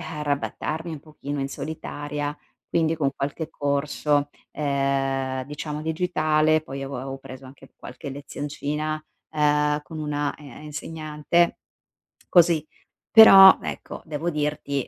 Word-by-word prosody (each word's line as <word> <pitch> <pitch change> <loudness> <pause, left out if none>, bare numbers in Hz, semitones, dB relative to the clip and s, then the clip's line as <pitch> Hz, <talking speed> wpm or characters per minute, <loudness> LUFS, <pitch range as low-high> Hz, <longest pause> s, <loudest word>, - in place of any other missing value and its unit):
arrabattarmi 150 +1 -3
un 155 -3 -6
pochino 145 -2 -7
in 135 0 -2
solitaria, 145 0 -5 0.3
quindi 165 -1 +1
con 140 -3 +1
qualche 145 +4 -4
corso, 145 0 0 0.2
ehm, 135 -2 -1
diciamo 150 +2 -5
digitale. 155 -2 +1
Poi 135 -2 -7
avevo 135 0 -5
preso 130 0 -11
anche 130 +1 -15
qualche 125 - -9
lezioncina, 145 +2 -4 0.4
uhm, 150 -1 +2
con 160 +1 -9
una, 145 -1 -2
e 150 - -14
ehm, 135 - -12
insegnante, 155 +2 -1 0.7
così. 170 -3 +4 0.5
Però, 195 -4 +10
ecco, - - -6
devo 155 +2 -2
dirti 150 -3 -2
150 Hz, 115 wpm, -24 LUFS, 140-155 Hz, 0.7 s, Però